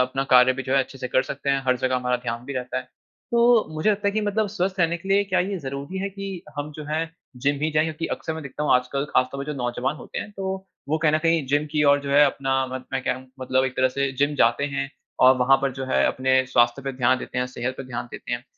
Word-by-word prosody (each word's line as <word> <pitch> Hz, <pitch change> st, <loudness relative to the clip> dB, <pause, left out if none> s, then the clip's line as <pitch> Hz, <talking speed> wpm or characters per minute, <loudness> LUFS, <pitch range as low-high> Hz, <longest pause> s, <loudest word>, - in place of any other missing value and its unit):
अपना 135 Hz, +2 st, -1 dB
कार्य 125 Hz, +1 st, +7 dB
भी 130 Hz, +1 st, -5 dB
जो 130 Hz, -, -3 dB
है -, -, +5 dB
अच्छे 135 Hz, +1 st, -12 dB
से 125 Hz, -, -4 dB
कर 130 Hz, -, +3 dB
सकते 140 Hz, 0 st, -3 dB
हैं, 135 Hz, 0 st, +1 dB
हर 130 Hz, 0 st, +3 dB
जगह 130 Hz, +1 st, 0 dB
हमारा 125 Hz, 0 st, 0 dB
ध्यान 120 Hz, -1 st, -5 dB
भी 140 Hz, -, -6 dB
रहता 125 Hz, 0 st, -3 dB
है। 130 Hz, 0 st, -9 dB, 0.4 s
तो 235 Hz, -1 st, +5 dB
मुझे 155 Hz, +7 st, +2 dB
लगता 200 Hz, 0 st, 0 dB
है -, -, -1 dB
कि 215 Hz, -, 0 dB
मतलब 210 Hz, +1 st, 0 dB
स्वस्थ 195 Hz, -1 st, -2 dB
रहने 170 Hz, +1 st, +2 dB
के 180 Hz, +3 st, -11 dB
लिए 200 Hz, +1 st, +4 dB
क्या 185 Hz, -2 st, +1 dB
ये 195 Hz, +2 st, -1 dB
ज़रूरी 140 Hz, +4 st, -5 dB
है 195 Hz, +1 st, -2 dB
कि 195 Hz, -2 st, -6 dB
हम 145 Hz, +1 st, -4 dB
जो 155 Hz, -, -7 dB
हैं 160 Hz, +2 st, -2 dB, 0.3 s
जिम 145 Hz, +2 st, +1 dB
ही 155 Hz, -, +1 dB
जाएँ? 155 Hz, 0 st, +2 dB
क्योंकि 160 Hz, +1 st, -3 dB
अक्सर 160 Hz, -, -5 dB
मैं 160 Hz, -, -6 dB
देखता 140 Hz, +2 st, -6 dB
हूँ 150 Hz, -, +3 dB
आजकल 125 Hz, +2 st, 0 dB
ख़ास 130 Hz, -, +4 dB
तौर 140 Hz, 0 st, -4 dB
पे -, -, -17 dB
जो 150 Hz, -, -4 dB
नौजवान 125 Hz, +3 st, -2 dB
होते -, -, -7 dB
हैं, -, -, -6 dB
तो 190 Hz, -1 st, -4 dB, 0.2 s
वो 155 Hz, -, +1 dB
कहीं 155 Hz, -1 st, +2 dB
न 155 Hz, -, +3 dB
कहीं 165 Hz, -2 st, +2 dB
जिम 145 Hz, +3 st, +1 dB
की 150 Hz, -1 st, +2 dB
ओर 145 Hz, 0 st, +5 dB
जो 140 Hz, 0 st, -5 dB
है 145 Hz, +1 st, +7 dB
अपना 135 Hz, -1 st, -1 dB
मन 130 Hz, 0 st, -6 dB
मैं 135 Hz, -, -1 dB
कह -, -, 0 dB
रहा 130 Hz, -, -2 dB
हूँ 130 Hz, -, -17 dB
मतलब 130 Hz, 0 st, +1 dB
एक 130 Hz, -1 st, -3 dB
तरह 130 Hz, 0 st, +3 dB
से 140 Hz, +1 st, -1 dB
जिम 145 Hz, +1 st, +2 dB
जाते 120 Hz, +2 st, +3 dB
हैं 135 Hz, 0 st, -2 dB, 0.4 s
और 130 Hz, 0 st, +7 dB
वहाँ 130 Hz, +2 st, +5 dB
पर 135 Hz, -1 st, +1 dB
जो 135 Hz, +1 st, -5 dB
है 130 Hz, -, +2 dB
अपने 130 Hz, 0 st, +2 dB
स्वास्थ्य 120 Hz, +1 st, +2 dB
पे 135 Hz, 0 st, -3 dB
ध्यान 130 Hz, 0 st, +2 dB
देते 125 Hz, -, -5 dB
हैं, 125 Hz, -, 0 dB
सेहत 125 Hz, 0 st, -4 dB
पे 135 Hz, -, -6 dB
ध्यान 120 Hz, -1 st, -5 dB
देते -, -, -7 dB
हैं। -, -, -3 dB
140 Hz, 290 wpm, -24 LUFS, 130-160 Hz, 0.4 s, कार्य